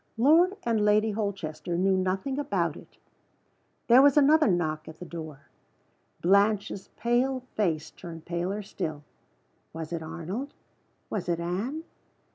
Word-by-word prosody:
Lord 330 - +5
and 225 -3 +1
Lady 210 +1 +3
Holchester 190 -6 -3
knew 190 +1 +3
nothing 190 +9 -1
about 290 0 0
it. - - -15 0.9
There 245 +2 +7
was 285 0 +5
another 305 +2 +6
knock 155 -5 0
at 160 - -10
the 180 - -8
door. 155 -5 -8 0.8
Blanche's 200 +1 +2
pale 255 +3 +1
face 160 -7 0
turned 165 -2 -10
paler 180 +4 -2
still. 155 -6 -5 0.7
Was 160 +1 -6
it 165 - -3
Arnold? 170 - -5 0.6
Was 190 -4 -3
it 170 -1 0
Anne? 205 - -3
195 Hz, 130 wpm, -28 LUFS, 170-240 Hz, 0.9 s, There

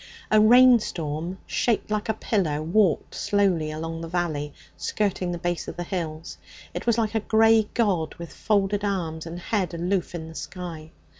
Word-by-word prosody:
A 215 0 +6
rainstorm, 210 -9 +4
shaped 230 -3 0
like 215 +1 -1
a 220 - +1
pillar, 180 -10 0
walked 180 +1 +2
slowly 190 -6 +1
along 165 +1 -5
the 165 - -5
valley, 160 -4 -2 0.2
skirting 190 -4 -1
the 175 - -3
base 175 0 -2
of - - -7
the 175 - -2
hills. 165 -3 -5 0.3
It - - -6
was 235 -1 +3
like 220 -2 0
a 220 - +2
grey 220 0 +4
god 185 -9 +1
with 170 -1 -9
folded 205 -1 0
arms 165 -5 -2
and 165 +1 -6
head 185 -1 -2
aloof 175 +1 -1
in 160 -1 -6
the 160 - -10
sky. 165 -2 -7
180 Hz, 170 wpm, -25 LUFS, 165-210 Hz, 0.3 s, A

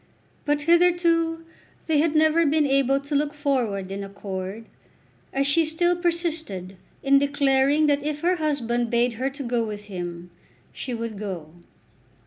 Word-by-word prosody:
But 295 0 0
hitherto 335 -1 +3 0.4
they 315 -3 +2
had 315 0 +1
never 315 +2 +4
been 305 0 +2
able 275 0 +2
to 285 +2 -7
look 295 +1 0
forward 240 -10 -1
in 200 +1 -4
accord, 195 +1 -6 0.7
as 275 0 0
she 285 +4 +4
still 345 +3 +1
persisted 325 - -2 0.3
in 275 0 +5
declaring 280 +1 +2
that 290 -1 +2
if 300 0 -3
her 355 +2 +2
husband 245 -7 -1
bade 240 +1 +2
her 265 - +1
to 275 +1 -7
go 240 -1 0
with 210 -2 -6
him, 175 -3 -7 0.4
she 260 - -6
would 230 -3 -5
go. 180 -7 -6
280 Hz, 150 wpm, -24 LUFS, 225-315 Hz, 0.7 s, in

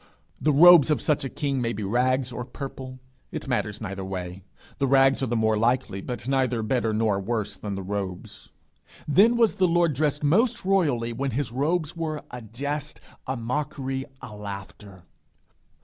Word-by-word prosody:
The 150 - +3
robes 165 0 +8
of 150 - +2
such 150 -2 0
a 135 - -3
king 140 -2 -2
may 115 -1 -1
be 105 - -5
rags 125 +4 +1
or 125 - -4
purple; 130 0 -8 0.3
it - - -6
matters 110 -5 -1
neither 95 0 -5
way. 90 -1 -5 0.4
The 135 - +2
rags 135 0 +4
are 130 - 0
the 120 - -1
more 110 -1 +2
likely, 115 -4 0
but 120 +3 -6
neither 130 -4 +1
better 115 0 0
nor 110 -2 +1
worse 105 0 -2
than 100 +1 -5
the 95 - -5
robes. 95 -2 -5 0.6
Then 210 +10 +5
was 230 -3 +4
the 190 -2 +2
Lord 170 -2 +2
dressed 145 +1 0
most 215 - +2
royally 145 -12 +1
when 135 +4 -2
his 140 -5 -2
robes 155 +5 -1
were 155 -2 -3
a 125 - -7
jest, 140 +6 -5 0.3
a 130 0 -2
mockery, 135 +2 -3 0.2
a 105 - -8
laughter. 100 -2 -9
130 Hz, 175 wpm, -25 LUFS, 110-145 Hz, 0.6 s, robes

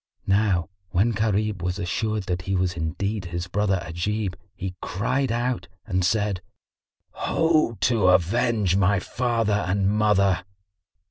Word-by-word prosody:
Now 95 -3 +2 0.2
when 95 +7 +2
Gharib 105 -2 0
was 90 +1 -2
assured 110 +2 -1
that 90 -1 -2
he 95 +2 -2
was 90 -1 +1
indeed 90 +5 -2
his 85 0 -4
brother 95 0 0
Ajib, 95 +4 -2 0.2
he 95 0 -4
cried 125 +6 -1
out 120 -5 -1 0.2
and 95 -4 0
said, 100 0 +1 0.7
"Ho, 160 -8 +1
to 115 -6 +3
avenge 95 +2 +3
my 100 0 +3
father 115 -1 0
and 95 +1 +1
mother!" 100 -3 +3
100 Hz, 130 wpm, -24 LUFS, 90-110 Hz, 0.7 s, to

